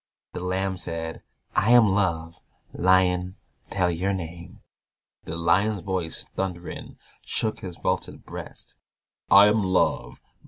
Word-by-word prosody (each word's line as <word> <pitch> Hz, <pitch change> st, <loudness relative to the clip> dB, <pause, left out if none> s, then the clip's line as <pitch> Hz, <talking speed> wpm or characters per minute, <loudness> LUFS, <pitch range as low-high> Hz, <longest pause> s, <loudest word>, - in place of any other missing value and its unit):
The -, -, -4 dB
Lamb 95 Hz, +1 st, -1 dB
said, 80 Hz, -1 st, -3 dB, 0.3 s
"I 105 Hz, -, +3 dB
am 120 Hz, -3 st, +7 dB
Love"; 85 Hz, -5 st, 0 dB, 0.4 s
"Lion, 90 Hz, 0 st, +2 dB, 0.3 s
tell 90 Hz, -2 st, +1 dB
your 95 Hz, +4 st, -1 dB
name." 85 Hz, -2 st, -7 dB, 0.6 s
The 80 Hz, -, -5 dB
Lion's 95 Hz, +4 st, +2 dB
voice 90 Hz, -3 st, -3 dB
thundering 90 Hz, -2 st, -5 dB, 0.3 s
Shook 110 Hz, -1 st, -1 dB
his 90 Hz, -3 st, -8 dB
vaulted -, -, -2 dB
breast, -, -, -10 dB, 0.5 s
"I 100 Hz, +1 st, +9 dB
am 105 Hz, +1 st, +3 dB
Love. 60 Hz, -9 st, 0 dB
90 Hz, 120 wpm, -25 LUFS, 85-95 Hz, 0.6 s, I